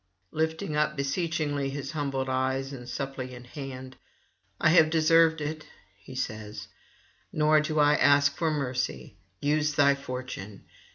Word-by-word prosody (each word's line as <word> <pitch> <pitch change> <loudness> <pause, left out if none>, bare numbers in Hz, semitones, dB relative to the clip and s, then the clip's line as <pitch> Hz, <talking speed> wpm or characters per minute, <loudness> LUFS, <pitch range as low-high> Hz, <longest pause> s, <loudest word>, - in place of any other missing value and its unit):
Lifting 160 -1 -2
up 150 0 +1
beseechingly 145 -1 -1
his 140 0 -5
humbled 140 -4 -2
eyes 130 +1 -1
and 125 -2 -9
suppliant 130 -1 -5
hand: 130 -1 -8 0.6
'I 155 - +4
have 160 -1 +6
deserved 160 0 +4
it,' 155 +1 -5 0.3
he 100 +6 -13
says, 110 -4 -5 0.6
'nor 155 0 +4
do 155 0 -3
I 145 0 +5
ask 145 +1 +4
for 165 -2 0
mercy; 130 -7 -3 0.3
use 150 +1 +1
thy 140 -1 +5
fortune. 125 -7 -7
140 Hz, 130 wpm, -28 LUFS, 130-155 Hz, 0.6 s, have